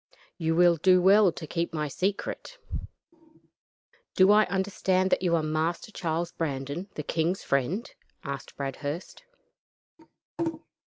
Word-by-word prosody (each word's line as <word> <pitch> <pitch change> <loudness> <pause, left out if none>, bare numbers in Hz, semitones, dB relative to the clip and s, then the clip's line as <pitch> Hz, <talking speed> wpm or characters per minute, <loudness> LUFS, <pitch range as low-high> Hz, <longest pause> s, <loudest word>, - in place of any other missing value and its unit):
You 165 -1 +1
will 175 0 +5
do 185 +3 +5
well 195 +1 +6
to 160 - -7
keep 170 +1 -3
my 150 -1 -1
secret." 200 - -3 1.6
"Do 190 +1 +6
I 215 +1 +6
understand 190 0 0
that - - +3
you 175 -2 +2
are 160 - +1
Master 160 +7 -1
Charles 170 -2 -2
Brandon, 145 +4 -4
the 150 - -4
king's 165 +5 -1
friend?" 140 - 0 0.4
asked 140 -2 -6
Bradhurst. 145 +4 -5
170 Hz, 120 wpm, -27 LUFS, 155-190 Hz, 1.6 s, well